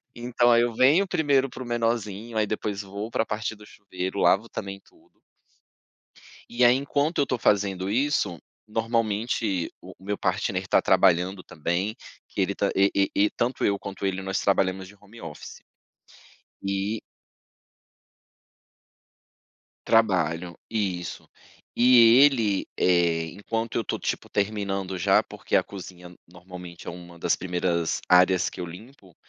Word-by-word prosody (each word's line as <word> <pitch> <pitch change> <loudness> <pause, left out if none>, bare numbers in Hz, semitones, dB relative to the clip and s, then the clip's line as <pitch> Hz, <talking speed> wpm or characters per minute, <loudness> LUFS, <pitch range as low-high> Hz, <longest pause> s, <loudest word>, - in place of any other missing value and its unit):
Então 120 0 +2
aí 120 0 +5
eu 120 -1 0
venho 150 - +4
primeiro 140 -6 +2
para 130 - -8
o - - -10
menorzinho, 115 -2 -2
aí 110 - +3
depois 105 -1 -3
vou 100 +2 -6
para 115 - 0
a - - -13
partir 110 +1 -3
do 105 - -15
chuveiro, 95 -1 -6
lavo 95 +6 +3
também 100 -1 -6
tudo. - - -26 1.4
E 120 +1 +2
aí, 120 +1 +7
enquanto 145 +4 -1
eu 140 - +2
tô 125 - -1
fazendo 95 -3 +1
isso, 115 - 0 0.3
normalmente 110 -3 -1
o - - -12
o 95 - -18
meu 105 0 -2
partner 95 0 -1
está 95 - +2
trabalhando 90 0 +3
também, 90 +5 -2 0.3
que - - -4
ele - - +1
tá - - 0
e 100 +1 +4
e 100 0 +2
-e 105 +1 +3
tanto 120 +2 -2
eu 100 0 +2
quanto 100 0 -7
ele, 95 0 -2
nós 95 0 -2
trabalhamos 95 -1 +1
de 105 - -15
home 105 +3 -15
office. 75 -2 -9 1.0
E 100 +2 -2 2.9
Trabalho, 90 -6 +1
isso, 95 -6 -3 0.5
e 120 -1 +7
ele, 115 -9 +2
eh, 85 -2 +2
enquanto 115 +4 -4
eu 115 - +1
estou - - -3
tipo - - -3
terminando 100 -2 -2
já, 95 +2 +3
porque - - -7
a - - +4
cozinha 90 -2 -11
normalmente 90 0 -11
é - - -2
uma 85 0 -11
das 85 0 +1
primeiras 90 -2 -1
áreas 90 0 +5
que 95 - -9
eu - - -3
limpo. 95 - -13
100 Hz, 150 wpm, -25 LUFS, 90-115 Hz, 2.9 s, aí